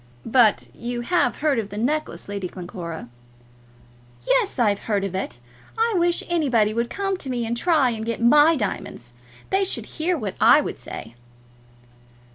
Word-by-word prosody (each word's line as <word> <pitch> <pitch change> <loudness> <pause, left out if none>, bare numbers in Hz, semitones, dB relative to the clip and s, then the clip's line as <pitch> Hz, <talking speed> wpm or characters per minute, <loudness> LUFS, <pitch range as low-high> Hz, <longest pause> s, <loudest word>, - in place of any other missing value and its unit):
"But 230 -2 +3
you 240 0 -4
have 350 +5 0
heard 280 -6 +3
of 210 -2 -4
the 205 - -7
necklace, 300 +8 -2
Lady 200 -2 -4
Glencora?" 175 -5 -7 1.2
"Yes, - - +1
I've 210 -5 +2
heard 200 -2 +1
of 195 -2 -3
it. 190 -9 -4 0.4
I 455 0 +2
wish 345 -1 +2
anybody 255 -11 +2
would 235 +1 -1
come 390 -1 -2
to 280 - -6
me 240 -2 -1
and 230 +1 -2
try 290 -2 +2
and 220 -1 -4
get 230 +1 -3
my 295 +7 +6
diamonds! 155 - -4 0.4
They 385 +1 +3
should 390 - -2
hear 340 +2 -1
what 210 -8 -4
I - - +7
would - - -4
say." 115 - -8
240 Hz, 165 wpm, -23 LUFS, 205-325 Hz, 1.2 s, I